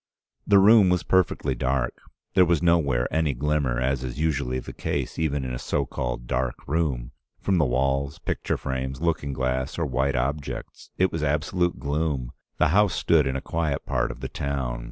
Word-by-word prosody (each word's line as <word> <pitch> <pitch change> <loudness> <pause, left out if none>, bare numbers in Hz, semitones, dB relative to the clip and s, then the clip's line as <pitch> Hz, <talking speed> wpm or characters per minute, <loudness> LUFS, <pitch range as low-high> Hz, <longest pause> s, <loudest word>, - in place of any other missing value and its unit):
"The 100 - +6
room 100 0 +7
was 90 -1 +2
perfectly 90 -6 +1
dark. 65 +1 -1 0.4
There 90 - +6
was 85 -1 +2
nowhere 70 -8 +3
any 80 -4 +1
glimmer, 70 -2 0
as 65 0 0
is 65 +2 -5
usually 70 -5 0
the 65 - -7
case, - - -3
even 75 -4 0
in 65 - -4
a - - -4
so 70 +2 -1
called - - -4
dark 65 0 -2
room, 70 -5 -1 0.3
from 95 -3 +1
the 75 - +4
walls, 70 +2 0
picture - - -2
frames, 65 0 -3
looking 80 -3 -1
glass 65 +1 -2
or 85 - 0
white 65 0 0
objects. 70 +4 -3
It 95 0 +3
was 80 - -3
absolute 80 +4 0
gloom. 70 -4 -1 0.3
The - - +3
house 100 +3 +3
stood 75 -5 +3
in 65 - -1
a 70 - -2
quiet 80 -4 -2
part - - 0
of 60 - -8
the 65 - -3
town. 65 -4 -3
70 Hz, 185 wpm, -25 LUFS, 65-80 Hz, 0.4 s, room